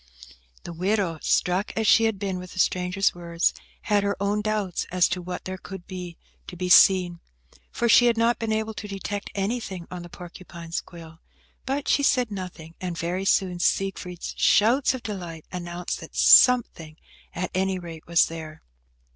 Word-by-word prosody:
The 170 - -7
widow, 185 -1 -1
struck 180 +3 +1
as 220 - 0
she 225 +1 +5
had 220 -2 0
been 190 -2 -3
with 180 0 -10
the 185 - -7
stranger's 180 +2 +1
words, 170 -1 -1 0.3
had 205 -2 +1
her 200 0 -1
own 200 +1 0
doubts 210 -4 -2
as 180 -1 +3
to 180 - -2
what 180 +1 -6
there 185 0 -5
could 190 -2 -9
be 180 -2 -8 0.3
to 180 - -9
be 180 +1 -3
seen, 180 -2 +6 0.5
for 235 - -1
she 245 +2 +6
had 235 -1 +2
not 230 +1 +2
been 225 -1 -2
able 220 0 -1
to 210 - -7
detect 200 0 -5
anything 195 -3 -3
on 180 -1 -6
the 175 - -10
porcupine's 170 -1 -8
quill, 165 -2 -13 0.5
but 275 +2 -2
she - - +3
said 250 -5 +2
nothing, 180 -4 -7
and 180 -2 -4
very 180 +3 -2
soon 185 -2 +1
Siegfried's 180 -1 -2
shouts 250 +6 +4
of 255 - -8
delight 175 -6 -7
announced 175 -1 -5
that - - -12
something, 170 -11 +5 0.4
at 180 +1 -3
any 190 0 0
rate, 165 -3 -10
was 170 0 +4
there. 160 -1 -9
185 Hz, 175 wpm, -25 LUFS, 175-210 Hz, 0.5 s, seen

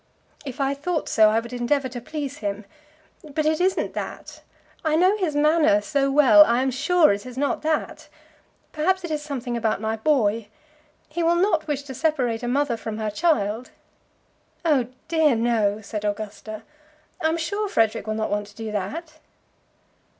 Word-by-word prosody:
"If 265 +1 -7
I 275 0 +1
thought 310 +3 -2
so, 215 -1 +5
I 220 +1 +2
would 235 +2 -8
endeavour 260 +3 0
to 245 -1 -7
please 285 +1 -5
him. 205 0 -4 0.6
But 305 0 -3
it 310 +2 +1
isn't 375 +1 0
that. - - -7 0.4
I 310 -1 +1
know 365 +5 +4
his 350 -7 -1
manner 305 +1 +4
so 280 -3 0
well! 260 -8 +7
I 235 +4 +2
am 265 - 0
sure 305 - +3
it 200 - -5
is 255 0 -10
not 285 +1 0
that. 315 0 -2 0.6
Perhaps 370 +5 0
it 345 - -5
is 300 -1 -1
something 260 -5 -4
about 225 -3 0
my 220 +1 -1
boy. 225 -4 +1 0.6
He 335 +3 -4
will 335 +1 +3
not 345 -3 +1
wish 285 -2 -2
to 275 -2 -8
separate 255 -6 0
a 240 - -4
mother 270 -1 0
from 220 -1 -5
her 215 -1 -2
child." 230 -5 0 1.0
"Oh 280 -7 +3 0.2
dear, 320 -5 +3
no," 220 -3 +1
said 210 0 -5
Augusta. 215 +1 -5 0.6
"I 315 - +2
am 325 - 0
sure 405 +6 -2
Frederic 220 - +1
will 215 - -1
not 220 0 -2
want 205 0 -1
to 205 - -17
do 225 -1 -6
that." 310 - -5
270 Hz, 180 wpm, -24 LUFS, 220-310 Hz, 1.0 s, well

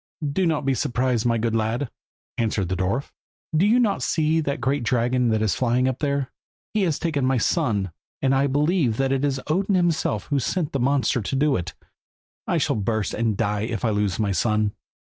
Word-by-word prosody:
"Do 185 +4 +1
not 155 -3 0
be 135 - +2
surprised, 125 -2 0
my 115 -1 +2
good 115 0 0
lad," 115 +4 -1 0.4
answered 110 -5 -1
the 95 - 0
dwarf, 100 +9 -1 0.4
"do 175 +6 +4
you 235 +4 +4
not 215 -5 +1
see 160 0 +1
that 140 -3 -2
great 135 +4 0
dragon 120 +1 +1
that 110 -1 +1
is 105 - +2
flying 125 +1 +1
up 130 -1 -2
there? 140 -3 -1 0.4
He 215 - +1
has 160 -5 0
taken 155 -5 -1
off - - +2
my 130 0 +2
son, 110 - 0 0.3
and 135 0 +2
I 135 +1 +3
believe 145 - +1
that 135 0 +1
it 135 0 0
is 135 -2 0
Odin 190 +6 +1
himself 170 - 0
that 145 - 0
has 135 - 0
sent 175 -6 -1
the 140 - -1
monster 130 -1 +1
to 120 - -3
do 145 +1 +2
it. 90 -1 -4 0.7
I - - +1
shall - - +1
burst 110 +1 -1
and 110 -2 0
die 105 +1 0
if 115 +2 -2
I 110 - +2
lose 105 -3 0
my 105 -2 0
son." 105 +1 +1
130 Hz, 215 wpm, -24 LUFS, 110-145 Hz, 0.7 s, do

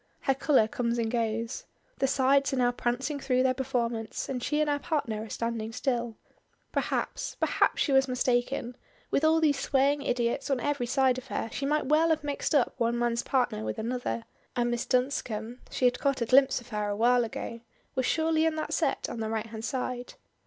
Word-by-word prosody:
Her 270 - +2
color 265 -4 +3
comes 235 +1 -1
and 225 -1 -1
goes. 230 0 -2 0.3
The 270 - +3
sides 275 +1 +3
are - - 0
now 245 -1 +3
prancing 245 +4 -2
through 255 -2 +1
their 260 -1 +3
performance, 240 -4 -2
and 255 -2 -3
she 295 +4 0
and 305 - +2
her 290 -1 +1
partner 260 -9 -2
are 220 - -9
standing 230 -1 -3
still. 240 -2 -2 0.5
Perhaps - - -2
perhaps - - +2
she 290 - -1
was 270 0 +4
mistaken; 250 0 0 0.4
with 280 - +1
all 320 +1 +5
these 295 -4 +2
swaying 280 +1 +2
idiots 245 +2 -1
on 270 -2 +1
every 280 -1 -1
side 260 0 +2
of 255 - -14
her 225 - -3
she 275 - -2
might 300 0 +1
well 310 +4 +3
have 315 -2 +1
mixed 290 +2 -1
up 265 -5 +3
one 235 0 +1
man's 235 0 +1
partner 250 - 0
with 110 0 -3
another; 220 - -3 0.3
and 240 0 +1
Miss 240 0 -2
Dunscombe 250 -3 -1
(she 255 - -1
had 250 0 +3
caught 275 -1 +1
a - - +2
glimpse 265 +3 +5
of 245 0 -15
her 210 -1 -2
awhile 240 +4 +3
ago) 230 0 -5 0.3
was 260 -1 0
surely 320 0 +2
in 320 - 0
that 310 - -3
set - - 0
on 235 - -6
the 220 -1 -2
right 220 0 -2
hand 220 0 -8
side. 250 0 -3
250 Hz, 200 wpm, -28 LUFS, 235-275 Hz, 0.5 s, all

